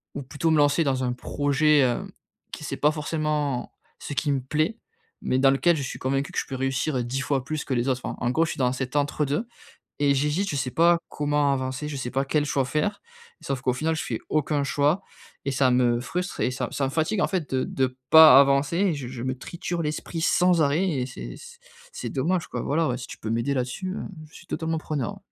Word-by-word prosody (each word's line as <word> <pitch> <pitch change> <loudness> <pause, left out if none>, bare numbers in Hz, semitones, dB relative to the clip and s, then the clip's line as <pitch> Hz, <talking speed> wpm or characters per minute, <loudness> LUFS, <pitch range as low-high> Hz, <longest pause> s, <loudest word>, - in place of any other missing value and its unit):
Ou 140 - -4
plutôt 150 +5 -1
me 155 - +4
lancer 145 +3 +4
dans 130 -3 0
un 125 - 0
projet, 145 +3 +2
hem, 125 -3 +1 0.4
qui - - -7
c'est - - -3
pas 150 - +3
forcément 150 -4 -2 0.3
ce - - -7
qui 140 +2 -1
me 135 - -1
plaît, 155 - -1 0.4
mais 130 - 0
dans 135 0 +5
lequel 165 +5 +3
je 140 - -3
suis 130 - -6
convaincu 135 +2 -1
que - - -6
je - - -3
peux 135 - -6
réussir 135 +1 -1
10 130 +3 -2
fois 135 -2 0
plus 155 +1 -3
que 135 - -2
les 120 +1 0
autres. 130 -1 0
Enfin, - - -4
en 120 - 0
gros 160 +5 +2
je - - -3
suis - - -6
dans 125 0 +2
cet 130 +1 -4
entre 145 +1 0
deux 150 - -1 0.5
et 140 -1 +3
j'hésite. 150 +8 0
Je - - -2
sais 130 -1 -1
pas 170 +3 +4
comment 145 -1 +1
avancer. 130 +2 -3
Je 150 - -5
sais 125 -2 -4
pas 135 +1 +1
quel 145 +2 +1
choix 140 -2 0
faire. 155 +10 -1 0.4
Sauf 135 -2 -3
qu'au 125 - +2
final, 160 +5 -1
je - - -3
fais 115 - -3
aucun 150 -1 +1
choix 145 +7 +1 0.4
et 140 - -1
ça 130 -1 +3
me 120 -1 +3
frustre 180 +10 -4
et - - +2
ça 130 - -3
ça 140 - -1
me 135 - -2
fatigue, 165 +7 0
en - - +3
fait, 180 -8 -3
de 130 -1 +1
de 130 -1 -2
pas 160 -4 +10
avancer 140 +3 +2
et 190 -3 +2
je 135 -4 -6
je 125 -2 -7
me 130 0 -2
triture 170 +5 -4
l'esprit 155 +2 -3
sans 175 0 +3
arrêt 155 +7 +2
et 130 -7 -1
c'est 130 - -8
c 475 0 -13 0.3
c'est 485 - -5
dommage, 165 +6 0
quoi. - - -4
Voilà, 160 +3 +1
ouais, 125 - -1
si 125 - -8
tu - - -9
peux 110 - -5
m'aider 115 +5 0
là-dessus, 130 +9 -3
heu, - - -5 0.3
je - - -21
suis 170 - -14
totalement 165 -1 -2
preneur. 150 -6 -3
140 Hz, 240 wpm, -25 LUFS, 130-155 Hz, 0.5 s, pas